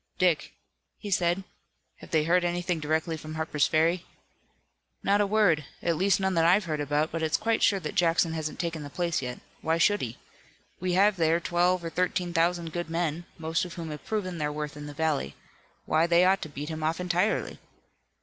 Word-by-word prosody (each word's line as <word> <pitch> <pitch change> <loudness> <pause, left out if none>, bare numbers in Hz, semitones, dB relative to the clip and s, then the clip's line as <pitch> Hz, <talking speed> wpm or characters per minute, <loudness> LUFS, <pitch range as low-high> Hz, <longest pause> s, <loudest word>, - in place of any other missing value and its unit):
"Dick," 180 -4 +1 0.4
he 205 - -7
said, 175 +1 +1 0.5
"have - - -13
they 155 -2 +2
heard 175 +3 +3
anything 175 0 -1
directly 160 +2 -1
from 155 +1 -8
Harper's 155 -2 +1
Ferry?" 165 +3 +2 1.0
"Not 200 +1 +3
a 205 - +2
word, 195 -7 +3 0.2
at 170 - +1
least 195 +4 +2
none 190 0 0
that 165 -2 +3
I've 180 +4 +4
heard 155 -3 -2
about, 145 +2 0
but 165 - -3
it's 160 0 +1
quite 225 0 0
sure 195 - +4
that 155 -4 -5
Jackson 165 -1 +2
hasn't 155 -1 -4
taken 165 -2 -2
the 145 - -7
place 170 +1 -1
yet. 125 -1 -5 0.2
Why 160 +1 +1
should 205 +5 +3
he? 120 -1 -4 0.6
We 180 0 -1
have 200 +2 +4
there 165 0 +3
twelve 175 +1 +1
or 165 - -4
thirteen 180 0 -1
thousand 170 -1 +1
good 175 -1 -3
men, 165 0 -2
most 160 0 -1
of 180 - -7
whom 165 -2 -5
have 150 - -7
proven 185 -6 -3
their 150 -1 -1
worth 150 0 -5
in 150 0 -8
the 145 - -9
valley. 150 - -1 0.5
Why, 160 +2 +2
they 170 +1 +5
ought 190 +1 +3
to 155 - -5
beat 145 +1 -6
him 160 -1 -5
off 160 +2 0
entirely." 180 +4 0
170 Hz, 205 wpm, -28 LUFS, 155-180 Hz, 1.0 s, they